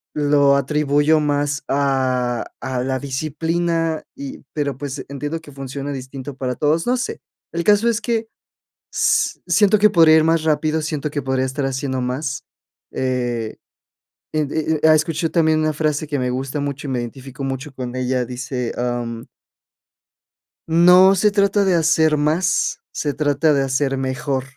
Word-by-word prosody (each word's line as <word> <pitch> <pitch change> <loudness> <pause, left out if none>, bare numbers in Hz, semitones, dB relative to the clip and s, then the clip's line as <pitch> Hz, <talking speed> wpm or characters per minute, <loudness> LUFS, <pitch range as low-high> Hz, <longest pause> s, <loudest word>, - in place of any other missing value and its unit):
lo 145 -1 +4
atribuyo 145 +2 +2
más 145 -1 -1
a 130 -3 0 0.2
a 130 -1 -2
la 130 0 -1
disciplina 160 +4 -1
y, 280 +1 -8
pero, 145 -4 -2
pues, 145 0 -6
entiendo 145 +3 -4
que 145 - -13
funciona 135 +1 -6
distinto 130 +1 -7
para 125 -2 -2
todos, 155 +6 +1
no 250 +1 +2
sé. 280 - -4 0.3
El 170 0 -1
caso 210 +4 +4
es 230 0 0
que 225 -1 -1 0.6
si - - +1
siento 210 0 +4
que 210 0 +6
podría 165 -4 +6
ir 155 - +4
más 165 -1 +2
rápido, 155 0 +1
siento 150 -1 -3
que 145 - -2
podría 130 0 0
estar 135 +1 -2
haciendo 130 -1 -2
más, 135 +2 -3 0.5
eh, 120 -3 -2 0.8
e 155 - +2
e 155 +2 -1
e 160 0 +7
escucho 160 +1 0
también 160 -2 +3
una 155 0 +1
frase 155 0 -1
que 145 -2 -2
me 125 0 -1
gusta 135 +3 -3
mucho 140 0 -4
y - - -3
me 125 - -1
identifico 135 +3 -7
mucho 135 +1 -4
con 125 -1 -6
ella, 125 -1 -1
dice, 125 0 -4
am 120 -1 -3 1.4
"no 180 +4 +6
se 210 +2 +3
trata 200 0 +2
de 185 - +3
hacer 160 -1 +3
más, 160 +4 +1
se 145 -2 -2
trata 150 +1 +2
de 135 -1 +2
hacer 135 0 0
mejor", 135 0 -2
145 Hz, 160 wpm, -20 LUFS, 130-160 Hz, 1.4 s, e